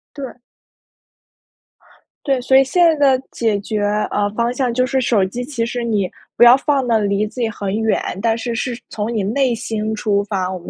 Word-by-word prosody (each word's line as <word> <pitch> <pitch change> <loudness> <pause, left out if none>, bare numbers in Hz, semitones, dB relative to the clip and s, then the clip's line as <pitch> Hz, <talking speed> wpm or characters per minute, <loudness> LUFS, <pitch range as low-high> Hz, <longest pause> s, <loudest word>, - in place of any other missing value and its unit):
对。 265 -4 -8 1.9
对， 270 -2 +1
所 265 +2 +2
以 270 - +7
现 315 +7 +2
在 290 -5 +4
的 260 - -12
解 220 -3 0
决， 210 +1 -3 0.3
呃， 205 0 0
方 235 +2 -1
向 250 -1 -1
就 255 +2 +1
是 265 0 0
手 225 -6 +2
机 240 +6 -5
其 245 -4 -3
实 240 +1 -4
你 210 -5 0 0.3
不 - - +6
要 240 +1 +9
放 275 -2 0
得 225 -2 +3
离 200 0 0
自 230 +4 -7
己 230 - +1
很 200 -2 -4
远， 220 - +1 0.2
但 225 0 +1
是 235 +1 -3
是 240 +1 -3
从 215 +2 -3
你 215 -3 -1
内 240 +4 +1
心 220 -1 -3
出 205 -1 0
发， 190 -3 -2
我 185 - -5
们 175 - -11
235 Hz, 220 characters per minute, -18 LUFS, 210-255 Hz, 1.9 s, 要